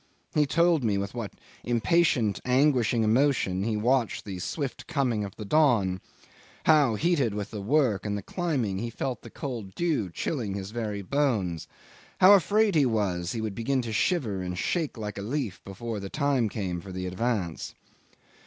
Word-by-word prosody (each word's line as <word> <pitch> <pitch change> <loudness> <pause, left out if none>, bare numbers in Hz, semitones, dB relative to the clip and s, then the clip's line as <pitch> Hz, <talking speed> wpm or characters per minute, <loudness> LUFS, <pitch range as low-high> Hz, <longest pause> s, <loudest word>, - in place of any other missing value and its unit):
He 150 -2 +3
told 170 -1 +3
me 105 -3 +1
with 100 0 -3
what 115 -4 -5 0.3
impatient 120 - +2
anguishing 125 -3 +3
emotion 110 -5 +2
he 110 +1 0
watched 120 +1 +1
the 95 -3 -5
swift 135 - -4
coming 120 -6 0
of 100 -2 -7
the 105 - -7
dawn; 100 - +3 0.6
how, 145 -7 +5
heated 140 - +1
with 105 -1 -4
the 105 -2 -5
work 115 -4 +2
and 105 -1 -2
the 100 - -6
climbing, 130 - -1
he 115 +2 -3
felt 120 0 -4
the 120 - -11
cold 115 -7 -6
dew 155 - 0
chilling 105 - -3
his 100 0 -5
very 105 -3 -3
bones; 95 - 0 0.5
how 190 +2 +9
afraid 205 +2 +4
he 155 -3 +4
was 95 -6 -1
he 115 - -3
would 110 -2 -3
begin 130 +4 0
to 115 -2 -4
shiver 110 - 0
and 90 0 -4
shake 160 - -1
like 105 -2 -5
a - - -4
leaf 120 -1 -3
before 110 +3 -5
the 100 -1 -6
time 140 -5 +1
came 90 -5 -3
for 95 - -10
the 90 0 -4
advance. 95 -2 -2
115 Hz, 175 wpm, -27 LUFS, 100-140 Hz, 0.6 s, how